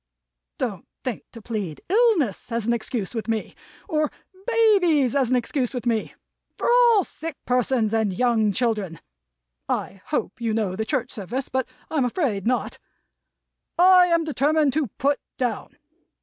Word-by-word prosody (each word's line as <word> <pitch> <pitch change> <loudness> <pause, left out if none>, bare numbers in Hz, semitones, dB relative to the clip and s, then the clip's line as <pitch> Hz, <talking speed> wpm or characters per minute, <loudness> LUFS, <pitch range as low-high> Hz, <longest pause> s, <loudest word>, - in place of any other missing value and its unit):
Don't - - -4 0.2
think - - -4
to 230 - -12
plead 205 -9 -4
illness 380 - +2
as 230 -2 -1
an 235 - +2
excuse 230 -3 -3
with 225 -2 -4
me; 225 -1 -2 0.3
or 305 -1 +1 0.4
babies 380 - +3
as 265 -4 +2
an 255 - +3
excuse 250 +1 -1
with 245 - -4
me; 230 -3 -1 0.4
for - - -2
all 475 -4 +5
sick 320 -2 -7
persons 245 -3 +1
and 220 -3 +1
young 220 0 +2
children 210 -7 -1 0.7
(I 195 - -3
hope 295 -4 -3
you 225 -2 0
know 205 -5 -1
the 220 +2 -2
church 255 -1 -1
service, 245 +5 -4
but 260 -1 -1 0.2
I'm 295 -5 +1
afraid 235 - -1
not) 250 0 -1 1.0
I 365 0 +7
am 335 -1 +2
determined 300 -1 +2
to 300 -2 0
Put 280 +7 0 0.2
Down. 250 -2 -3
250 Hz, 150 wpm, -24 LUFS, 225-310 Hz, 1.0 s, I